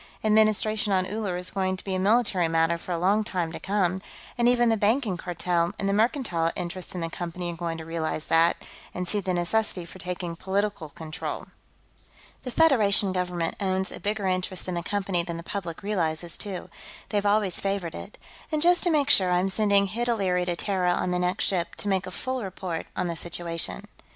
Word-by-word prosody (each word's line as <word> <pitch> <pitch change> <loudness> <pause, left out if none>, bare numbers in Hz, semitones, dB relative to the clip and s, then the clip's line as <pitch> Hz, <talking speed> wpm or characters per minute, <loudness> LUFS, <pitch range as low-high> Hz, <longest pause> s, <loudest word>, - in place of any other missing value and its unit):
"Administration 215 -1 +3
on 185 -1 +3
Uller 200 -2 -2
is 180 0 -3
going 190 -1 0
to - - -10
be 195 - -3
a 185 - 0
military 200 -3 +3
matter 165 +1 +2
for 170 +2 -7
a 170 - 0
long 200 +5 +3
time 175 -5 -2
to - - -6
come, 190 -2 0 0.3
and 240 0 +4
even 240 -1 +4
the 225 - +4
Banking 215 0 +2
Cartel 175 0 -1
and 195 - -1
the 195 - +2
mercantile 210 - +1
interests 180 +1 -5
in 180 - -3
the 165 - -2
Company 175 0 -4
are - - -8
going 165 -1 -3
to 160 - -7
realize 160 -1 -2
that, 165 +1 +4 0.4
and 180 0 -2
see 205 - +1
the 190 -2 -2
necessity 180 +1 0
for 180 +2 -12
taking 180 -2 -3
political 195 -2 -1
control. 155 +1 -6 0.9
The 255 - -6
Federation 215 -10 +4
Government 180 -2 -1
owns 190 -1 0
a - - -7
bigger 210 0 -1
interest 185 0 -1
in 185 - -2
the 170 - -1
Company 190 -1 0
than 170 -1 -5
the 170 - -7
public 175 -2 -5
realizes, 170 -4 0
too; 195 -3 -5 0.4
they've 205 -1 0
always 205 -3 +2
favored 195 -4 -2
it. 210 - -8 0.3
And 310 - +1
just 350 +3 +5
to - - +4
make 290 -3 +3
sure, 185 -2 +5
I'm 180 +2 +2
sending 200 0 +3
Hid 235 +5 -2
O'Leary 185 -6 +1
to 175 -1 -1
Terra 180 -1 +1
on 180 - 0
the 180 - +1
next 180 +1 +1
ship, 175 -3 -1
to - - -5
make 190 -1 +1
a - - -4
full 255 +7 -3
report 185 -3 -4
on 180 - -1
the 170 -1 -2
situation." 170 - -4
185 Hz, 205 wpm, -26 LUFS, 175-205 Hz, 0.9 s, just